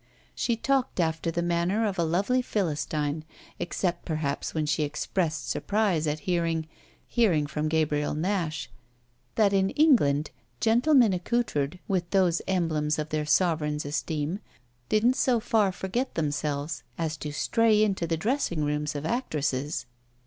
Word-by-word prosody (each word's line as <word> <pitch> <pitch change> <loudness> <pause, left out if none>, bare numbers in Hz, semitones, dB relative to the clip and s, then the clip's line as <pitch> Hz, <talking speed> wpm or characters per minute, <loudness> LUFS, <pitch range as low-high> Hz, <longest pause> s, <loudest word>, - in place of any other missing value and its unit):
She 235 - 0
talked 265 -1 0
after 165 0 0
the 170 +1 -1
manner 175 +6 +1
of 195 -4 -2
a - - +3
lovely 195 +10 +1
Philistine, 155 - -1 0.4
except 175 0 -2
perhaps 155 -4 -2
when 155 -1 -1
she 150 0 0
expressed 155 -1 -1
surprise 195 - 0
at 150 +1 -2
hearing 170 -4 0 0.4
hearing 185 -11 +2
from 150 +1 -2
Gabriel 150 -2 0
Nash 165 -4 -1 0.7
that 205 -2 +3
in 195 0 +3
England 155 - +3 0.3
gentlemen 240 -1 +4
accoutred 180 - -1
with 180 -3 -1
those 180 -3 +2
emblems 155 -5 0
of 155 0 -3
their 150 -1 -2
sovereign's 150 -3 +1
esteem 155 +4 -2 0.5
didn't 235 +5 +3
so 250 -3 +3
far 215 -3 +2
forget 190 +8 -3
themselves 145 -1 -2 0.2
as 160 -2 -2
to 150 - -5
stray 215 +7 +3
into 190 -5 0
the 165 0 0
dressing 200 - 0
rooms 150 0 -1
of 145 +1 -4
actresses. 150 - -1
165 Hz, 140 wpm, -27 LUFS, 150-205 Hz, 0.7 s, gentlemen